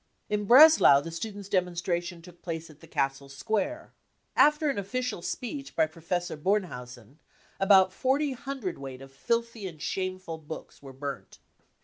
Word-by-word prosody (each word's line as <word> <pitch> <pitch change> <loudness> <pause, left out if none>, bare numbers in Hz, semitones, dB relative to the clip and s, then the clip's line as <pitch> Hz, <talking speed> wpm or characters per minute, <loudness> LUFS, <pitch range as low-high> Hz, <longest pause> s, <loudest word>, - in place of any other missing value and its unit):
" - - -45
In 210 0 -2
Breslau 260 - +8
the 165 +4 -7
students 200 +3 -6
3 200 -2 +3
demonstration 175 -1 -3
took 175 -1 -15
place 165 -2 -5
at 150 - -19
the 165 - -15
castle 135 -1 -2
square. 225 - -3 0.4
After 300 -1 +4
the 200 - -2
^official 225 -2 -3
speech 275 +3 -5
by 160 - +4
Professor 170 +2 -3
Bornhausen 140 - -3 0.4
about 190 -1 +5
forty 275 +6 +1
hundredweight 185 - -6
of 135 - -13
filthy 230 - -2
and 160 -4 -10
shameful 185 -1 -4
books 160 +1 -9
were 135 -1 -10
burnt. 140 +1 -7
180 Hz, 150 wpm, -28 LUFS, 155-225 Hz, 0.4 s, Breslau